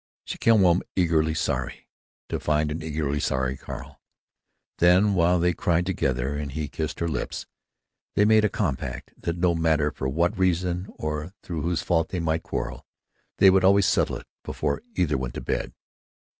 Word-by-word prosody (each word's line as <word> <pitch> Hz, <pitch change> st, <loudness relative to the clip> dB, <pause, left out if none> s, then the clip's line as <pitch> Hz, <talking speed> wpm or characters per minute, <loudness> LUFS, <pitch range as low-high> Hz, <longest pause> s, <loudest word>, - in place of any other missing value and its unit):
She -, -, -6 dB
came 115 Hz, -3 st, +5 dB
home 90 Hz, -1 st, +4 dB
eagerly 80 Hz, -3 st, +2 dB
sorry—to 80 Hz, -, -5 dB
find 75 Hz, 0 st, +1 dB
an 80 Hz, +2 st, -4 dB
eagerly 75 Hz, -2 st, -2 dB
sorry 65 Hz, -1 st, 0 dB
Carl. -, -, -9 dB, 0.8 s
Then, 90 Hz, +4 st, +5 dB
while 90 Hz, 0 st, +3 dB
they 90 Hz, +1 st, +2 dB
cried 85 Hz, +1 st, +1 dB
together, 65 Hz, -7 st, -1 dB
and 75 Hz, -1 st, -4 dB
he 75 Hz, +1 st, -4 dB
kissed 80 Hz, +1 st, -4 dB
her 85 Hz, -, +1 dB
lips, 75 Hz, -, -3 dB, 0.7 s
they 105 Hz, -, +4 dB
made 110 Hz, 0 st, +5 dB
a 105 Hz, -, +3 dB
compact 80 Hz, -12 st, -3 dB
that 85 Hz, 0 st, -4 dB
no 85 Hz, 0 st, +2 dB
matter 80 Hz, -3 st, +2 dB
for 65 Hz, -2 st, -3 dB
what 85 Hz, +6 st, +1 dB
reason 90 Hz, 0 st, +1 dB
or 75 Hz, +3 st, -4 dB
through 85 Hz, -3 st, -4 dB
whose 85 Hz, 0 st, -1 dB
fault 80 Hz, -2 st, +1 dB
they 90 Hz, -, -3 dB
might 80 Hz, 0 st, 0 dB
quarrel, -, -, -4 dB, 0.5 s
they 95 Hz, -, +7 dB
would 95 Hz, 0 st, +3 dB
always 100 Hz, +1 st, +5 dB
settle -, -, +2 dB
it -, -, -9 dB, 0.2 s
before 70 Hz, -, -2 dB
either 75 Hz, -7 st, +1 dB
went 65 Hz, -2 st, -5 dB
to -, -, -4 dB
bed.... -, -, -2 dB
85 Hz, 170 wpm, -25 LUFS, 75-90 Hz, 0.8 s, they